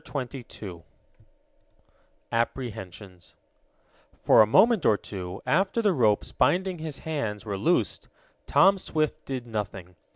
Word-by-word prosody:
CHAPTER 135 Hz, -1 st, -5 dB
XXII 95 Hz, -7 st, -9 dB, 1.5 s
APPREHENSIONS 100 Hz, -6 st, -5 dB, 0.9 s
For -, -, +7 dB
a 110 Hz, -, +5 dB
moment 220 Hz, -, +4 dB
or 105 Hz, -, +4 dB
two, 95 Hz, 0 st, -7 dB
after 190 Hz, +7 st, +1 dB
the 205 Hz, -3 st, +3 dB
ropes 110 Hz, -8 st, +1 dB
binding 185 Hz, -1 st, +1 dB
his 155 Hz, -3 st, -5 dB
hands 115 Hz, -10 st, -4 dB
were 100 Hz, -2 st, -3 dB
loosed, 140 Hz, -, 0 dB, 0.4 s
Tom 195 Hz, 0 st, +5 dB
Swift 155 Hz, -4 st, -2 dB
did 130 Hz, -3 st, -5 dB
nothing. 100 Hz, -5 st, -6 dB
120 Hz, 120 wpm, -26 LUFS, 100-160 Hz, 1.5 s, For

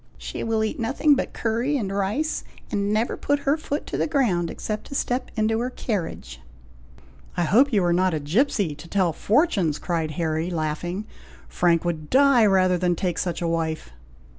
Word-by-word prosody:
She -, -, -6 dB
will 225 Hz, -1 st, 0 dB
eat 220 Hz, -, -3 dB
nothing 270 Hz, +6 st, +3 dB
but 275 Hz, -, -1 dB
curry 235 Hz, +6 st, 0 dB
and 200 Hz, -6 st, -3 dB
rice, 210 Hz, +11 st, -1 dB, 0.3 s
and 200 Hz, 0 st, 0 dB
never 220 Hz, +3 st, +1 dB
put 285 Hz, 0 st, 0 dB
her 280 Hz, +1 st, +2 dB
foot 305 Hz, -1 st, -4 dB
to -, -, -4 dB
the -, -, +1 dB
ground 220 Hz, -, +1 dB
except 215 Hz, -1 st, -5 dB
to 275 Hz, -, -7 dB
step 250 Hz, -1 st, -1 dB
into 220 Hz, 0 st, +1 dB
her 245 Hz, +2 st, -1 dB
carriage." 165 Hz, -, -4 dB, 1.0 s
"I 175 Hz, -, +2 dB
hope 250 Hz, -, +4 dB
you 205 Hz, -5 st, +3 dB
are 175 Hz, -1 st, +2 dB
not 185 Hz, -1 st, +2 dB
a -, -, -1 dB
gipsey, 185 Hz, -, +1 dB
to 150 Hz, +3 st, -12 dB
tell 180 Hz, -2 st, +1 dB
fortunes!" 200 Hz, -, +1 dB
cried 165 Hz, -3 st, -2 dB
Harry, 160 Hz, 0 st, -1 dB
laughing; 175 Hz, +4 st, -3 dB, 0.4 s
"Frank 170 Hz, -, +1 dB
would 160 Hz, -3 st, -3 dB
die 265 Hz, -4 st, +5 dB
rather 185 Hz, -2 st, +3 dB
than 175 Hz, -1 st, +1 dB
take 175 Hz, 0 st, -2 dB
such 175 Hz, -1 st, -2 dB
a -, -, 0 dB
wife." 160 Hz, -, -2 dB
195 Hz, 185 wpm, -24 LUFS, 170-240 Hz, 1.0 s, die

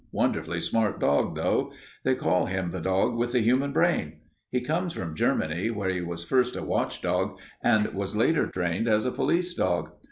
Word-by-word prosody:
Wonderfully 85 Hz, +1 st, 0 dB
smart 105 Hz, +5 st, 0 dB
dog, 70 Hz, -2 st, +2 dB
though. -, -, 0 dB, 0.3 s
They -, -, +2 dB
call -, -, +1 dB
him 95 Hz, -2 st, -2 dB
the -, -, -4 dB
dog 95 Hz, +5 st, +1 dB
with 120 Hz, +1 st, -1 dB
the 125 Hz, -, +4 dB
human 130 Hz, +5 st, +2 dB
brain. 135 Hz, -, +1 dB, 0.3 s
He 125 Hz, -, 0 dB
comes 165 Hz, +7 st, -1 dB
from 80 Hz, -4 st, -5 dB
Germany, 80 Hz, +7 st, 0 dB
where 100 Hz, -4 st, -1 dB
he 90 Hz, -1 st, -2 dB
was 85 Hz, -1 st, -5 dB
first 125 Hz, +6 st, +1 dB
a -, -, -4 dB
watchdog 95 Hz, +2 st, -1 dB, 0.3 s
and 110 Hz, -3 st, +4 dB
was 100 Hz, +1 st, -3 dB
later 150 Hz, +9 st, +3 dB
trained 90 Hz, +4 st, -1 dB
as 110 Hz, 0 st, +3 dB
a 125 Hz, -, +1 dB
police 175 Hz, +5 st, 0 dB
dog. 90 Hz, -, 0 dB
105 Hz, 185 wpm, -27 LUFS, 90-125 Hz, 0.3 s, the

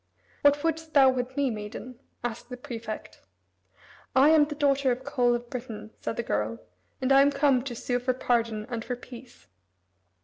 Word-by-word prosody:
"What 285 Hz, 0 st, +4 dB
would'st 320 Hz, -1 st, -2 dB
thou 270 Hz, -2 st, +7 dB
with 255 Hz, +1 st, -4 dB
me, 280 Hz, -3 st, +2 dB
maiden?" 220 Hz, +3 st, -7 dB, 0.2 s
asked 240 Hz, 0 st, -5 dB
the 250 Hz, -, -6 dB
prefect. 230 Hz, -5 st, -7 dB, 0.9 s
"I 270 Hz, +3 st, +7 dB
am 310 Hz, -2 st, +6 dB
the 295 Hz, 0 st, -6 dB
daughter 280 Hz, -2 st, +2 dB
of 250 Hz, +2 st, -3 dB
Coel 250 Hz, -3 st, +2 dB
of 240 Hz, 0 st, -5 dB
Britain," 225 Hz, -4 st, -7 dB
said -, -, -3 dB
the 235 Hz, -, -2 dB
girl, 105 Hz, -, -1 dB, 0.4 s
"and 260 Hz, +1 st, 0 dB
I 270 Hz, 0 st, +8 dB
am 280 Hz, -, +5 dB
come 275 Hz, -2 st, +3 dB
to 250 Hz, -1 st, -6 dB
sue 245 Hz, +1 st, -1 dB
for 250 Hz, +1 st, 0 dB
pardon 230 Hz, -4 st, 0 dB
and 235 Hz, -3 st, -4 dB
for 250 Hz, -, -3 dB
peace." 245 Hz, 0 st, -13 dB
250 Hz, 180 wpm, -27 LUFS, 235-275 Hz, 0.9 s, I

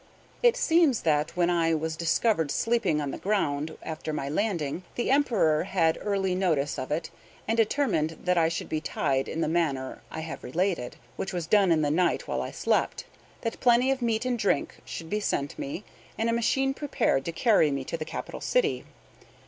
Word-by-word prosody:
It -, -, +4 dB
seems 330 Hz, -, +3 dB
that, 155 Hz, 0 st, 0 dB
when 175 Hz, 0 st, +3 dB
I 165 Hz, -1 st, +2 dB
was 160 Hz, +1 st, -2 dB
discovered 165 Hz, 0 st, +1 dB
sleeping 210 Hz, -4 st, +1 dB
on 145 Hz, -2 st, -2 dB
the -, -, -6 dB
ground 160 Hz, -7 st, -1 dB
after 155 Hz, 0 st, -5 dB
my 140 Hz, -2 st, -3 dB
landing, 170 Hz, -3 st, -1 dB
the 240 Hz, -, 0 dB
Emperor 215 Hz, -, +3 dB
had 165 Hz, -4 st, +1 dB
early 195 Hz, -2 st, 0 dB
notice 160 Hz, -7 st, 0 dB
of 130 Hz, -, -5 dB
it, 160 Hz, +2 st, -2 dB, 0.4 s
and 225 Hz, -, +1 dB
determined 215 Hz, -, +1 dB
that 180 Hz, 0 st, +2 dB
I 165 Hz, -2 st, +3 dB
should 165 Hz, -, -4 dB
be 155 Hz, -1 st, -2 dB
tied 135 Hz, -3 st, 0 dB
in 165 Hz, -, -3 dB
the -, -, +1 dB
manner 150 Hz, -6 st, -1 dB
I 160 Hz, -, -5 dB
have 160 Hz, 0 st, -7 dB
related 170 Hz, -4 st, -1 dB, 0.2 s
(which 190 Hz, -, -4 dB
was 175 Hz, -3 st, -2 dB
done 195 Hz, +1 st, +4 dB
in 155 Hz, -2 st, +3 dB
the 145 Hz, -, +1 dB
night, 175 Hz, +2 st, +1 dB
while -, -, -1 dB
I -, -, -4 dB
slept), -, -, 0 dB, 0.4 s
that 230 Hz, -, -3 dB
plenty 245 Hz, +1 st, +4 dB
of 265 Hz, -1 st, -1 dB
meat 230 Hz, 0 st, 0 dB
and 245 Hz, -2 st, 0 dB
drink 200 Hz, -8 st, 0 dB
should 165 Hz, -, -7 dB
be 210 Hz, +6 st, -1 dB
sent 140 Hz, -8 st, -2 dB
me, 145 Hz, +8 st, -5 dB, 0.3 s
and 225 Hz, +1 st, +1 dB
a -, -, 0 dB
machine 270 Hz, +3 st, +1 dB
prepared 275 Hz, -, 0 dB
to 170 Hz, -, -2 dB
carry 185 Hz, -3 st, +3 dB
me 140 Hz, -1 st, -2 dB
to 150 Hz, -, -4 dB
the 160 Hz, -, -3 dB
capital -, -, -6 dB
city. 485 Hz, -3 st, +1 dB
175 Hz, 195 wpm, -27 LUFS, 155-225 Hz, 0.4 s, It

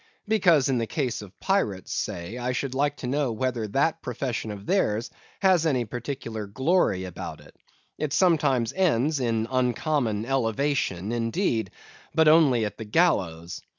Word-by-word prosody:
Because, 180 Hz, -10 st, +4 dB
in 130 Hz, -3 st, +1 dB
the 115 Hz, -, -2 dB
case 140 Hz, -9 st, -2 dB
of 100 Hz, -2 st, -13 dB
pirates, 105 Hz, -, 0 dB
say, 90 Hz, +8 st, -4 dB
I 125 Hz, +1 st, -1 dB
should 130 Hz, 0 st, -2 dB
like 145 Hz, +1 st, 0 dB
to -, -, -7 dB
know 140 Hz, -1 st, 0 dB
whether 115 Hz, -1 st, -2 dB
that 150 Hz, +9 st, +1 dB
profession 125 Hz, -2 st, -3 dB
of 100 Hz, -1 st, -7 dB
theirs 120 Hz, -, 0 dB, 0.3 s
has 185 Hz, -4 st, +4 dB
any 130 Hz, -5 st, +1 dB
peculiar 115 Hz, -2 st, -5 dB
glory 130 Hz, -, +1 dB
about 90 Hz, -2 st, -7 dB
it. -, -, -17 dB, 0.4 s
It 150 Hz, -2 st, -2 dB
sometimes 140 Hz, -10 st, +2 dB
ends 155 Hz, -5 st, +2 dB
in 115 Hz, -3 st, 0 dB
uncommon 125 Hz, -3 st, 0 dB
elevation, 120 Hz, -5 st, 0 dB
indeed; 115 Hz, -, 0 dB, 0.5 s
but 160 Hz, -1 st, +5 dB
only 145 Hz, -8 st, +5 dB
at 105 Hz, -, -6 dB
the 110 Hz, -, -5 dB
gallows. 95 Hz, -, +1 dB
125 Hz, 150 wpm, -26 LUFS, 110-150 Hz, 0.5 s, but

